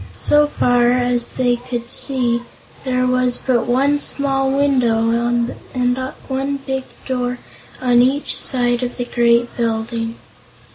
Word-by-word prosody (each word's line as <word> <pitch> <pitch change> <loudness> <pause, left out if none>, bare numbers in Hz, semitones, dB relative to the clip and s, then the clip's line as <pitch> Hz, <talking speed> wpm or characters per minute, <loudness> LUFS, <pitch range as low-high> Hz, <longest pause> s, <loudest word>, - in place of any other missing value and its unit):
So 295 - +3
far 245 -4 +2
as 245 -1 0
they 245 -2 +1
could 240 -1 -6
see, 245 -3 +1 0.4
there 255 -1 +1
was 255 -1 +2
but 250 -3 0
one 275 +4 +2
small 270 -2 0
window 255 -5 +2
and 240 +1 -1 0.3
one 275 +1 -2
big 265 -1 -4 0.2
door 250 -1 -2 0.4
on 245 -1 +4
each 270 +4 +1
side 245 -2 0
of 250 0 -4
the 245 - -2
great 240 0 +2
building. 230 0 -2
245 Hz, 130 wpm, -19 LUFS, 240-265 Hz, 0.4 s, on